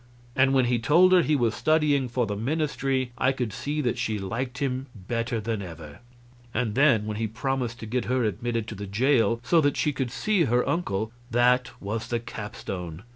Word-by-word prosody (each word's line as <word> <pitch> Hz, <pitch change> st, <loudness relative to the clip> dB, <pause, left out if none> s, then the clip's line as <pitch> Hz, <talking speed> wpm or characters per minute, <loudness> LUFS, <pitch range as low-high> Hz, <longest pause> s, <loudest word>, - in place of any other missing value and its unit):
And 130 Hz, 0 st, +4 dB
when 130 Hz, -2 st, +4 dB
he 120 Hz, -1 st, +1 dB
told 170 Hz, +10 st, +5 dB
her 180 Hz, -, +7 dB
he 155 Hz, -2 st, +2 dB
was 120 Hz, -5 st, +1 dB
studying 150 Hz, -4 st, +2 dB
for 120 Hz, 0 st, 0 dB
the 105 Hz, -1 st, -3 dB
ministry 135 Hz, 0 st, -1 dB
I 130 Hz, -, +3 dB
could 125 Hz, -6 st, -3 dB
see 150 Hz, +6 st, -2 dB
that 120 Hz, -3 st, -1 dB
she 110 Hz, -2 st, -1 dB
liked 120 Hz, +6 st, -4 dB
him 130 Hz, 0 st, -2 dB
better 115 Hz, +4 st, -2 dB
than 110 Hz, -1 st, -3 dB
ever. 80 Hz, -5 st, -9 dB, 0.6 s
And 110 Hz, -2 st, 0 dB
then, 130 Hz, -5 st, +4 dB
when 105 Hz, -1 st, -3 dB
he 110 Hz, 0 st, -1 dB
promised 120 Hz, +1 st, -2 dB
to -, -, -5 dB
get 125 Hz, +3 st, -2 dB
her 125 Hz, 0 st, +1 dB
admitted 115 Hz, +1 st, -2 dB
to -, -, -5 dB
the 100 Hz, -1 st, -7 dB
jail 115 Hz, +2 st, +2 dB
so 160 Hz, +6 st, +4 dB
that 145 Hz, -2 st, +1 dB
she 150 Hz, -, +1 dB
could 130 Hz, -2 st, -2 dB
see 190 Hz, -, +1 dB
her 125 Hz, 0 st, +1 dB
uncle, 110 Hz, -, -1 dB, 0.2 s
that 125 Hz, +1 st, +3 dB
was 110 Hz, +3 st, -4 dB
the 120 Hz, 0 st, -1 dB
capstone. 100 Hz, -7 st, -7 dB
120 Hz, 200 wpm, -26 LUFS, 110-135 Hz, 0.6 s, her